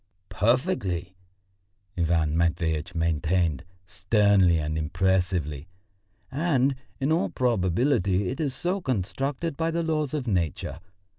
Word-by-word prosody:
"Perfectly," 105 Hz, -, 0 dB, 0.8 s
Ivan 80 Hz, -3 st, +1 dB
Matveitch 85 Hz, 0 st, 0 dB
maintained 80 Hz, -1 st, 0 dB, 0.2 s
sternly 95 Hz, -2 st, +3 dB
and 75 Hz, 0 st, -2 dB
impressively. 85 Hz, -2 st, 0 dB, 0.6 s
"And 140 Hz, -2 st, +2 dB, 0.3 s
in 140 Hz, +3 st, 0 dB
all 165 Hz, +3 st, +2 dB
probability, 100 Hz, -, +1 dB
it 130 Hz, -, -5 dB
is 140 Hz, -5 st, -1 dB
so 185 Hz, +3 st, -1 dB
constructed 135 Hz, -, -2 dB
by 165 Hz, +2 st, 0 dB
the 165 Hz, 0 st, -1 dB
laws 155 Hz, -3 st, -1 dB
of 140 Hz, -4 st, -2 dB
Nature. 90 Hz, -, -2 dB
95 Hz, 105 wpm, -26 LUFS, 85-135 Hz, 0.8 s, sternly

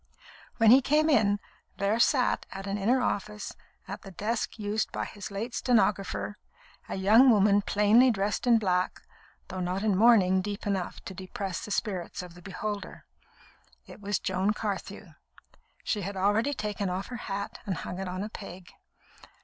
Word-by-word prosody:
When 225 Hz, -2 st, +6 dB
he 260 Hz, +2 st, +8 dB
came 305 Hz, +4 st, +3 dB
in, 205 Hz, -6 st, +3 dB, 0.4 s
there 200 Hz, +3 st, +1 dB
sat 255 Hz, +1 st, +2 dB
at 195 Hz, 0 st, -7 dB
an 200 Hz, 0 st, -2 dB
inner 240 Hz, +6 st, +2 dB
office, 210 Hz, 0 st, -3 dB, 0.3 s
at -, -, -6 dB
the 195 Hz, -, -10 dB
desk 215 Hz, +7 st, -3 dB
used 215 Hz, 0 st, -2 dB
by -, -, -3 dB
his 205 Hz, -2 st, -8 dB
late 220 Hz, +5 st, -5 dB
stenographer, 210 Hz, -4 st, 0 dB, 0.5 s
a -, -, -3 dB
young 215 Hz, +7 st, +6 dB
woman 205 Hz, -2 st, +5 dB
plainly 210 Hz, +6 st, +4 dB
dressed 210 Hz, +1 st, -1 dB
in 235 Hz, -1 st, +6 dB
black, 185 Hz, -4 st, 0 dB, 0.5 s
though 185 Hz, -, -5 dB
not 185 Hz, +2 st, -2 dB
in 210 Hz, -3 st, +2 dB
mourning 190 Hz, -4 st, +5 dB
deep 205 Hz, +1 st, -5 dB
enough 195 Hz, -3 st, -2 dB
to 190 Hz, -, -8 dB
depress 190 Hz, 0 st, -5 dB
the -, -, -7 dB
spirits 190 Hz, -4 st, -3 dB
of 180 Hz, -2 st, -11 dB
the 180 Hz, -, -14 dB
beholder. 200 Hz, +2 st, -6 dB, 0.8 s
It -, -, -13 dB
was 205 Hz, 0 st, -1 dB
Joan 190 Hz, +2 st, 0 dB
Carthew. 200 Hz, -3 st, -5 dB, 0.7 s
She 210 Hz, -, -1 dB
had 195 Hz, +1 st, -5 dB
already 215 Hz, +9 st, +2 dB
taken 205 Hz, -3 st, -3 dB
off 185 Hz, +2 st, -3 dB
her 245 Hz, -, -5 dB
hat 200 Hz, -3 st, -5 dB
and 190 Hz, -, -1 dB
hung 180 Hz, -, -6 dB
it 195 Hz, -, -4 dB
on 185 Hz, +2 st, -4 dB
a 210 Hz, -, -5 dB
peg. 185 Hz, -4 st, -10 dB
205 Hz, 170 wpm, -28 LUFS, 190-220 Hz, 0.8 s, he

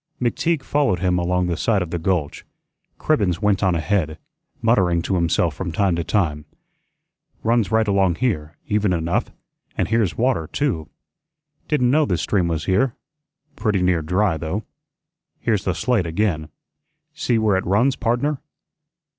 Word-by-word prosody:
McTeague 140 Hz, +5 st, 0 dB
followed 140 Hz, -9 st, +1 dB
him 90 Hz, 0 st, +1 dB
along 90 Hz, +1 st, +1 dB
the 85 Hz, -1 st, -1 dB
side 100 Hz, +2 st, +1 dB
of 85 Hz, -, -9 dB
the 85 Hz, -, -2 dB
gulch. 85 Hz, -4 st, -1 dB, 0.5 s
Cribbens 100 Hz, -, +1 dB
went 105 Hz, -2 st, +1 dB
on 95 Hz, -3 st, +2 dB
ahead, 80 Hz, -2 st, 0 dB, 0.4 s
muttering 95 Hz, -7 st, +2 dB
to 95 Hz, -, -2 dB
himself 85 Hz, -2 st, +1 dB
from 90 Hz, +4 st, -4 dB
time 95 Hz, +1 st, +1 dB
to 85 Hz, -, -1 dB
time: 75 Hz, -7 st, 0 dB, 1.0 s
"Runs 115 Hz, -3 st, +2 dB
right 110 Hz, 0 st, +2 dB
along 95 Hz, -3 st, +2 dB
here, 85 Hz, -10 st, -2 dB
even 105 Hz, -2 st, +1 dB
enough, 85 Hz, 0 st, -1 dB, 0.5 s
and -, -, 0 dB
here's 110 Hz, -6 st, +1 dB
water 120 Hz, -10 st, +1 dB
too. 95 Hz, -, -2 dB, 0.8 s
Didn't 125 Hz, -6 st, +2 dB
know 155 Hz, +2 st, +4 dB
this 90 Hz, -9 st, -1 dB
stream 95 Hz, -5 st, +1 dB
was 80 Hz, -2 st, -2 dB
here; 105 Hz, +7 st, +1 dB, 0.6 s
pretty 105 Hz, -5 st, 0 dB
near 90 Hz, -2 st, +2 dB
dry, 90 Hz, +2 st, +1 dB
though. 85 Hz, +7 st, -3 dB, 0.8 s
Here's 105 Hz, -4 st, 0 dB
the 90 Hz, -, 0 dB
slate 110 Hz, -2 st, +1 dB
again. 80 Hz, -3 st, -1 dB, 0.6 s
See 120 Hz, -, 0 dB
where 110 Hz, -3 st, +2 dB
it 95 Hz, -, -1 dB
runs, 120 Hz, +8 st, +3 dB
pardner?" 130 Hz, +5 st, 0 dB
95 Hz, 155 wpm, -21 LUFS, 85-115 Hz, 1.0 s, know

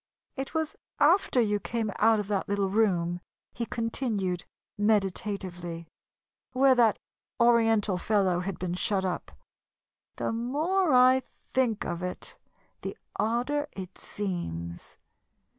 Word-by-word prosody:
"It 270 Hz, +3 st, -5 dB
was 315 Hz, -1 st, -1 dB, 0.2 s
after 315 Hz, -3 st, +4 dB
you 210 Hz, -3 st, +2 dB
came 225 Hz, -1 st, -2 dB
out 220 Hz, 0 st, +5 dB
of 205 Hz, -, -3 dB
that 200 Hz, -2 st, -1 dB
little 200 Hz, -1 st, 0 dB
room," 175 Hz, -5 st, +1 dB, 0.3 s
he 235 Hz, -, -3 dB
continued, 220 Hz, -6 st, -1 dB, 0.3 s
meditatively, 190 Hz, -5 st, -1 dB, 0.7 s
"where 265 Hz, +1 st, +5 dB
that 235 Hz, -4 st, +4 dB, 0.4 s
Oriental 225 Hz, -5 st, +4 dB
fellow 190 Hz, -3 st, +2 dB
had 185 Hz, 0 st, -3 dB
been 180 Hz, -1 st, -3 dB
shut 190 Hz, +1 st, 0 dB
up. 180 Hz, -, -3 dB, 0.8 s
The -, -, -2 dB
more 300 Hz, +10 st, +1 dB
I 255 Hz, +1 st, +6 dB
think 255 Hz, -3 st, -2 dB
of 175 Hz, 0 st, -3 dB
it, 180 Hz, 0 st, -5 dB, 0.5 s
the -, -, -5 dB, 0.2 s
odder 250 Hz, +7 st, 0 dB
it 185 Hz, -1 st, -8 dB
seems. 85 Hz, -, -5 dB
210 Hz, 120 wpm, -28 LUFS, 185-245 Hz, 0.8 s, I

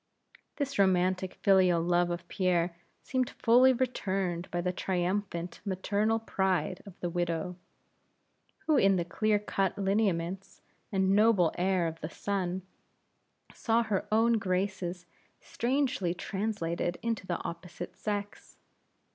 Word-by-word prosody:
This 280 Hz, -4 st, -3 dB
romantic 185 Hz, -1 st, +2 dB
filial 185 Hz, -3 st, +5 dB
love 175 Hz, +1 st, +2 dB
of 175 Hz, 0 st, -4 dB
Pierre 175 Hz, -3 st, +1 dB, 0.3 s
seemed 255 Hz, -1 st, 0 dB
fully 250 Hz, +3 st, +5 dB
returned 195 Hz, -8 st, -1 dB
by 175 Hz, -, -2 dB
the 180 Hz, +1 st, -1 dB
triumphant 180 Hz, -1 st, -2 dB
maternal 205 Hz, +3 st, 0 dB
pride 190 Hz, -4 st, -1 dB
of 190 Hz, -, -12 dB
the 175 Hz, -, -1 dB
widow, 175 Hz, 0 st, -2 dB, 1.1 s
who 310 Hz, -2 st, +3 dB
in 195 Hz, -5 st, +5 dB
the 175 Hz, -2 st, 0 dB
clear 215 Hz, +4 st, +1 dB
cut 195 Hz, -2 st, -1 dB
lineaments 195 Hz, -2 st, -1 dB, 0.3 s
and 190 Hz, -1 st, +2 dB
noble 205 Hz, -5 st, +4 dB
air 185 Hz, -1 st, +1 dB
of 165 Hz, 0 st, -4 dB
the 155 Hz, -, -4 dB
son, 185 Hz, -1 st, -2 dB, 0.9 s
saw 230 Hz, 0 st, +1 dB
her 210 Hz, -4 st, -1 dB
own 225 Hz, +1 st, +4 dB
graces 185 Hz, -2 st, -2 dB, 0.3 s
strangely 245 Hz, -8 st, -1 dB
translated 175 Hz, -4 st, -2 dB
into 230 Hz, -5 st, -2 dB
the 175 Hz, -, -1 dB
opposite 175 Hz, +1 st, -7 dB
sex. 205 Hz, -1 st, -5 dB
190 Hz, 120 wpm, -30 LUFS, 175-210 Hz, 1.1 s, filial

